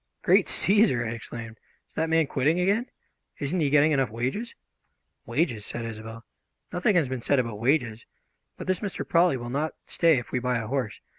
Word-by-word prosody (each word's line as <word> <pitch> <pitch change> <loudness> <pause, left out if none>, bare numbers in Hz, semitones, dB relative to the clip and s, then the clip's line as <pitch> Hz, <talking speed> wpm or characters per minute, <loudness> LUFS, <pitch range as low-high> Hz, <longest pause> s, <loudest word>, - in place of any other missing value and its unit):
"Great - - +4
Cæsar!" 195 - +3
I - - -3
exclaimed. 115 0 -8 0.3
"Is - - -31
that 160 0 -1
man 160 -1 +3
quitting 145 +5 +1
again? 200 +7 +1 0.5
Isn't 150 +6 -1
he 150 -3 +2
getting 150 +2 +4
enough 135 -4 +2
wages?" 130 - -3 0.7
"Wages?" 125 -11 0
said 120 +2 -5
Isobel. 115 0 -8 0.5
"Nothing 180 +3 +2
has 165 -6 +3
been 130 -1 -4
said 140 - +2
about 115 -5 -1
wages. 120 -3 0 0.5
But - - -7
this 185 -1 0
Mr. 200 -3 -4
Prawley 170 -4 +3
will 120 0 -6
not 150 +4 -2
stay 165 -4 +3
if 120 - -5
we 125 - 0
buy 125 0 0
a 115 - -3
horse. 125 -3 -3
135 Hz, 190 wpm, -26 LUFS, 115-165 Hz, 0.7 s, Great